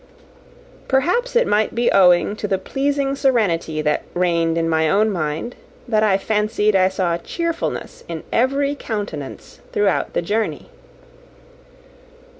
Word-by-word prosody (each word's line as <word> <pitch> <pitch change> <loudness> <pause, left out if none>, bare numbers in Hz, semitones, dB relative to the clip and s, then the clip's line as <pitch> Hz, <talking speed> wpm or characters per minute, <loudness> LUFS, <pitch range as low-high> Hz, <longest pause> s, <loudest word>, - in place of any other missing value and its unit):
Perhaps 360 - +1
it 485 - +4
might 210 +1 +1
be 240 0 +2
owing 180 +1 +4
to 210 - -3
the 195 - +1
pleasing 275 +6 -1
serenity 185 - +1
that 150 0 +1
reigned 170 -2 +1
in 165 0 +1
my 160 -1 +2
own 210 +4 +3
mind, 160 +6 -3 0.3
that 215 -3 +2
I 205 -3 +3
fancied 210 0 0
I 185 0 +4
saw 180 -3 -1
cheerfulness 335 - -4
in - - -6
every 275 +4 +1
countenance 205 - -6
throughout 205 -2 0
the - - -1
journey. 205 - -2
210 Hz, 130 wpm, -20 LUFS, 170-260 Hz, 0.3 s, it